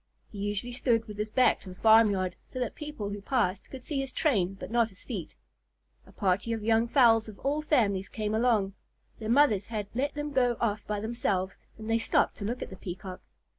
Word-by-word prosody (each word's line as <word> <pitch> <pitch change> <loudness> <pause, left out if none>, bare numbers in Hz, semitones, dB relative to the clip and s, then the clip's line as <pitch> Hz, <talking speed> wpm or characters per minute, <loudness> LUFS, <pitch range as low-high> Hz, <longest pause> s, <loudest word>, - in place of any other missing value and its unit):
He 205 - -8
usually 205 +4 -2
stood 235 -2 +1
with 210 -1 -9
his 210 +1 -2
back 255 +4 +3
to 190 - -11
the 180 - -9
farmyard, 205 -4 +4
so - - -11
that 250 -3 -2
people 295 -10 -6
who 205 0 -5
passed 200 -5 0
could 260 -2 -9
see 285 0 -2
his 270 -1 -3
train 195 - +1
but 195 - -8
not 235 -1 +3
his 190 - -15
feet. 200 - -6 0.7
A - - -15
party 200 +4 0
of 225 -2 -4
young 225 +1 +3
fowls 230 -4 +5
of 205 - -11
all 290 +2 0
families 210 -11 +1
came 215 -1 -3
along. 220 -4 +2 0.5
Their 220 -1 -5
mothers 235 -6 +4
had 215 -3 -3
let 275 +5 -1
them 295 0 -4
go 245 -3 +2
off 215 -2 0
by 210 -1 -2
themselves, 200 -4 -1 0.2
and 220 0 -8
they 225 0 +2
stopped - - +1
to 200 - -5
look 240 +4 -2
at - - -9
the 190 - -9
Peacock. 185 0 -7
220 Hz, 215 wpm, -29 LUFS, 200-245 Hz, 0.7 s, fowls